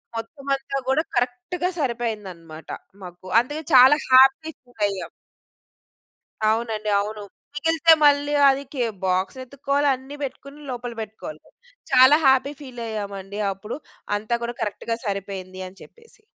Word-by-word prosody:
మొత్తం 270 Hz, +5 st, -7 dB
అంతా 275 Hz, 0 st, -5 dB
గూడా 270 Hz, +4 st, +2 dB
కరెక్ట్‌గా 250 Hz, +9 st, -1 dB
సరిపోయింది 235 Hz, -7 st, -2 dB
అన్నమాట 165 Hz, -2 st, -13 dB, 0.3 s
మాకు. 180 Hz, 0 st, -11 dB, 0.2 s
అందుకే 295 Hz, +6 st, -6 dB
చాలా 260 Hz, +3 st, +8 dB
హ్యాపీ 265 Hz, +4 st, +6 dB
ఫీల్ 245 Hz, -3 st, -17 dB
అయ్యాం. 195 Hz, -2 st, -5 dB, 1.4 s
అవునండి, 220 Hz, -1 st, 0 dB
అవును. 210 Hz, +1 st, -4 dB, 0.3 s
మిగిలితే 325 Hz, +2 st, +4 dB
మళ్ళీ 290 Hz, 0 st, +4 dB, 0.2 s
అది 275 Hz, +1 st, 0 dB
కే 255 Hz, -4 st, 0 dB, 0.2 s
బాక్స్ 185 Hz, +5 st, 0 dB
వెతుక్కోవాలి. 280 Hz, +2 st, -1 dB
అన్నీ 265 Hz, +3 st, -11 dB
పెట్టుకొని 280 Hz, +2 st, -7 dB
లోపల 245 Hz, -1 st, -5 dB
పెట్టుకోవాలి. 205 Hz, -8 st, -8 dB, 0.5 s
చాలా 260 Hz, +3 st, +7 dB
హ్యాపీ 265 Hz, +1 st, +4 dB
ఫీల్ 255 Hz, -4 st, -9 dB
అయ్యామండి 200 Hz, -2 st, -5 dB
అప్పుడు. 210 Hz, +6 st, -7 dB, 0.4 s
అంతా 215 Hz, +3 st, -2 dB
కూడా 240 Hz, 0 st, -4 dB
కరెక్ట్‌గా 225 Hz, +2 st, -3 dB
సరిపోయింది 195 Hz, -2 st, -5 dB
అని 185 Hz, +1 st, -15 dB
చెప్పేసి. 460 Hz, -2 st, -20 dB
245 Hz, 130 wpm, -23 LUFS, 205-275 Hz, 1.4 s, చాలా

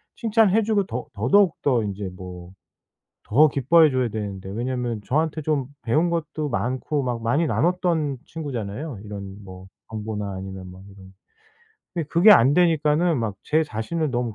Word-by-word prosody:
칭찬해 225 Hz, -2 st, +3 dB
주고 205 Hz, -2 st, +1 dB
더 125 Hz, +1 st, -4 dB
더더욱 160 Hz, -, +3 dB
더 125 Hz, -5 st, +2 dB
인제 100 Hz, -1 st, -4 dB
뭐 90 Hz, -1 st, -10 dB, 0.8 s
더 150 Hz, +8 st, +6 dB
기뻐해 150 Hz, +4 st, +4 dB
줘야 130 Hz, -2 st, +1 dB
되는데. 100 Hz, -3 st, -5 dB
왜냐하면 120 Hz, +1 st, -3 dB
저한테 155 Hz, +2 st, 0 dB
좀 140 Hz, -4 st, 0 dB, 0.2 s
배운 155 Hz, +9 st, +1 dB
것도 155 Hz, -2 st, -3 dB
많고 130 Hz, +4 st, -1 dB
막 120 Hz, -2 st, -2 dB
많이 145 Hz, +9 st, +2 dB
나눴던 165 Hz, -5 st, 0 dB
친구잖아요 135 Hz, -4 st, -5 dB
이런 100 Hz, -1 st, -8 dB
뭐 95 Hz, 0 st, -11 dB, 0.2 s
정보나 105 Hz, -2 st, -4 dB
아니면 95 Hz, -1 st, -7 dB
뭐 90 Hz, +1 st, -13 dB
이런. 95 Hz, -1 st, -15 dB, 0.8 s
근데 165 Hz, -4 st, -2 dB
그게 180 Hz, +7 st, +7 dB
안 135 Hz, -, +5 dB
되니까는 165 Hz, -2 st, +3 dB
'막 110 Hz, -3 st, -2 dB
제 155 Hz, +1 st, +2 dB
자신을 150 Hz, +5 st, -3 dB
너무 120 Hz, -3 st, -2 dB
130 Hz, 315 characters per minute, -23 LUFS, 105-160 Hz, 0.8 s, 그게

